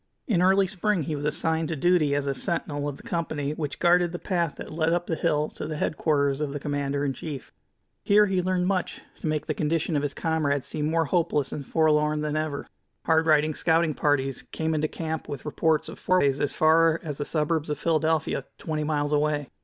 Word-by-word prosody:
In 195 -9 +1
early 190 +2 +4
spring 190 -1 0
he 150 +2 -3
was 145 0 -4
assigned 160 +1 0
to 165 - -1
duty 155 -2 +2
as 145 -1 -1
a 140 - 0
sentinel 145 -2 -2
of 140 - -7
the - - -15
company 165 -9 -2
which 150 -2 -4
guarded 175 0 +3
the 175 - -4
path 170 -4 -1
that - - -8
led 160 +1 +1
up 175 0 0
the 170 - -2
hill 150 -1 +1
to - - -6
the 155 -1 -4
headquarters 145 -2 0
of 145 -2 -2
the 145 - -3
commander 145 0 -2
in 135 - 0
chief. 145 -2 -7 0.5
Here 210 +1 +5
he 190 -2 0
learned 180 0 0
much 185 -1 -1 0.2
to - - -4
make 155 -1 -1
the - - -1
condition 160 +1 -1
of 145 - +2
his 145 -1 -3
comrades 145 -4 0
seem 150 0 -2
more 165 0 +2
hopeless 150 -4 0
and 145 - -5
forlorn 150 -1 +2
than 150 0 -2
ever. 155 -2 -2 0.4
Hard 160 0 +3
riding 155 0 +4
scouting 165 0 +2
parties 135 -2 0
came 160 0 -3
into 155 0 +1
camp 160 0 -5
with 140 -3 -6
reports 155 +1 +1
of - - -9
forays 145 -7 +2
as 145 - +1
far 165 +1 +4
as 150 -4 -5
the - - 0
suburbs 155 +1 -1
of 150 - -1
Philadelphia, 160 -1 0
twenty 155 -2 -3
miles 150 -1 0
away. 150 -2 0
155 Hz, 215 wpm, -26 LUFS, 145-165 Hz, 0.5 s, Here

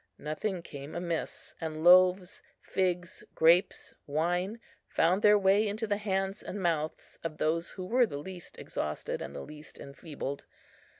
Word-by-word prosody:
Nothing 170 +4 -3
came 140 -2 -9
amiss; 170 -1 -4
and 155 -1 -4
loaves, 185 +1 +5 0.2
figs, 180 -2 -2
grapes, 170 +4 +3
wine, 175 +8 0 0.3
found 180 +4 +2
their 210 0 +7
way 200 +2 +4
into 215 +2 -2
the 205 -1 0
hands 195 -1 -1
and 205 - -6
mouths 160 -4 -2
of 160 -2 -4
those 165 +2 0
who 185 - -6
were 245 +4 +3
the 145 - -5
least 180 +3 -9
exhausted 75 0 -4
and - - -6
the - - -5
least 150 - -11
enfeebled. 140 0 -7
175 Hz, 145 wpm, -30 LUFS, 155-195 Hz, 0.3 s, their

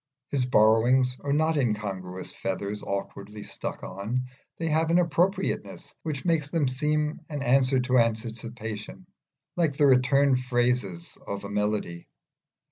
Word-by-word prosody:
His 135 -3 +1
borrowings 125 +2 +4
are 140 - -3
no 155 +2 +3
incongruous 105 - -2
feathers 100 +2 -3
awkwardly 100 +1 -5
stuck - - -6
on; 120 +6 -3 0.3
they 165 - -2
have 160 +1 +2
an 170 - +4
appropriateness 175 +3 0
which 150 -2 -4
makes 160 -4 +1
them 155 -3 +1
seem 150 +4 0
an 145 -3 -3
answer 130 +1 +3
to 130 0 +3
anticipation, 115 - -3 0.5
like 160 -5 +1
the 150 - +4
return 135 +1 +4
phrases 120 -8 -1
of 100 0 -4
a 100 - -6
melody. 105 -4 -2
125 Hz, 130 wpm, -27 LUFS, 105-145 Hz, 0.5 s, borrowings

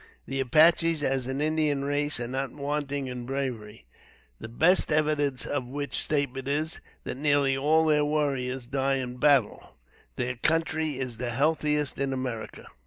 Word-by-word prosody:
The 135 0 -3
Apaches, 160 +4 +4
as 130 -2 0
an 135 +2 -2
Indian 150 -2 +1
race, 145 -1 0
are 120 - -3
not 135 +2 -3
wanting 145 -1 -3
in 125 -1 -6
bravery, 120 - -5 0.5
the 110 - -8
best 165 +12 +3
evidence 150 -3 +1
of 140 -4 -3
which 140 +2 -5
statement 140 -3 -2
is, 155 +3 -2 0.2
that - - -5
nearly 145 -1 +2
all 155 +4 +3
their 150 -1 +3
warriors 135 -4 -1
die 135 +1 0
in 125 -2 -4
battle. 135 -4 +2 0.4
Their 125 0 -2
country 160 +1 0
is 125 -3 -4
the 125 -1 -2
healthiest 150 +2 0
in 135 -1 0
America. 125 -4 -5
140 Hz, 155 wpm, -27 LUFS, 130-150 Hz, 0.5 s, Apaches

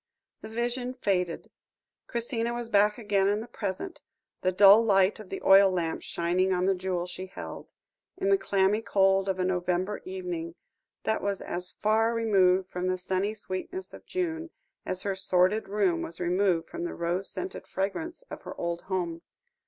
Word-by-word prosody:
The - - -8
vision 245 +2 -2
faded. 180 -8 -1 0.6
Christina 235 0 -1
was 240 -1 -5
back 210 0 +4
again 205 -4 +1
in 205 +1 +2
the 225 - -7
present 225 - -5 0.4
the 185 - +2
dull 200 +3 +8
light 195 -1 +3
of 210 -4 -10
the 195 - -6
oil 195 0 +7
lamp 170 -3 -2
shining 180 +2 0
on 180 0 +1
the 195 - +4
jewel 180 -1 -2
she 180 +1 -6
held - - -8 0.5
in 195 - 0
the 195 - +5
clammy 195 +2 +2
cold 195 -2 +3
of 190 - 0
a 185 - 0
November 185 +2 -1
evening, 180 -3 -5 0.5
that 220 - 0
was 200 -1 -1
as 180 0 -3
far 225 +2 +1
removed 190 -5 +3
from 180 0 -3
the 185 0 0
sunny 190 +3 -1
sweetness 215 - -5
of - - -12
June, 335 -2 -2 0.4
as 185 0 -2
her 200 - 0
sordid 190 +2 +2
room 195 -5 +1
was 165 - -5
removed 180 -1 +1
from 340 - -6
the 345 - -4
rose 175 +3 -1
scented 370 - -5
fragrance 320 - -3
of - - -7
her - - -8
old 170 0 -2
home. 170 -3 -2
195 Hz, 175 wpm, -28 LUFS, 180-220 Hz, 0.6 s, dull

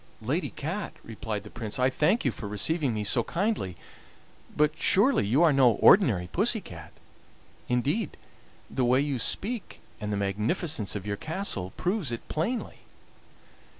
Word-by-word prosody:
"Lady 145 +11 -1
Cat," 175 +8 -4
replied 110 -2 -5
the 105 - -12
Prince, 110 -3 -5
"I 130 +1 +2
thank 170 - +2
you 130 - +3
for 105 - -7
receiving 135 - 0
me 105 -2 -2
so 115 +3 +2
kindly, 175 - -2 0.8
but 150 +1 +3
surely 200 - +3
you 135 +10 +3
are 160 -3 +5
no 130 -4 +5
ordinary 110 - +5
pussy 220 +4 +2
cat? 80 - -11 0.8
Indeed, 140 - 0 0.5
the 130 - -1
way 125 +2 +4
you 140 -2 -1
speak 215 - -1 0.2
and 105 -1 -4
the 100 - -1
magnificence 105 - -1
of 100 -1 -5
your 100 -1 -2
castle 155 - -2
prove 180 - -1
it 115 - -6
plainly." 220 +11 -2
130 Hz, 150 wpm, -27 LUFS, 105-175 Hz, 0.8 s, are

